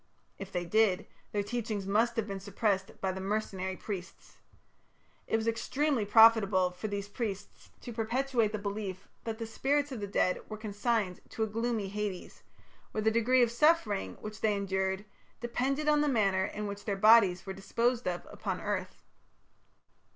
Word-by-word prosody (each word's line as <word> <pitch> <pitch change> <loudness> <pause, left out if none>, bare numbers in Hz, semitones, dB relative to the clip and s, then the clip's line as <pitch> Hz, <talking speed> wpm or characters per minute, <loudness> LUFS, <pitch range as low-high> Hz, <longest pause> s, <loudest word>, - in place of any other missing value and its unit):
If 195 0 -7
they 175 -1 -2
did, 210 0 +2 0.3
their 205 -1 0
teachings 215 -2 -3
must 225 +4 +2
have 225 - 0
been 195 -1 -4
suppressed 200 0 -1
by 190 - 0
the 190 0 -5
mercenary 190 -2 -2
priests. 190 -3 -7 0.9
It - - +1
was 225 0 -3
extremely 260 +2 0
profitable 205 -4 +6
for 180 +4 -5
these 200 -1 -4
priests 205 -2 -5
to 240 - -7
perpetuate 235 0 0
the 215 - -2
belief 200 -2 -5 0.2
that 225 -1 -3
the 230 - -4
spirits 285 +5 0
of 255 - -4
the 205 - -4
dead 185 -2 +1
were 215 - -5
consigned 210 -2 -1
to 225 -3 -2
a - - 0
gloomy 225 -1 -1
Hades, 205 -2 -5 0.5
where 215 - -1
the 220 - +4
degree 245 +3 +4
of 235 - +1
suffering 235 - +2
which 215 0 -7
they 215 -1 +2
endured 190 0 -1 0.3
depended 270 +5 -1
on 300 -1 +4
the 295 - +2
manner 195 -6 +2
in 210 +2 -5
which 200 0 -6
their 200 -2 -1
bodies 200 -4 +6
were 190 - -4
disposed 230 +5 0
of 175 -1 -2
upon - - -3
earth. - - -4
210 Hz, 170 wpm, -31 LUFS, 195-230 Hz, 0.9 s, profitable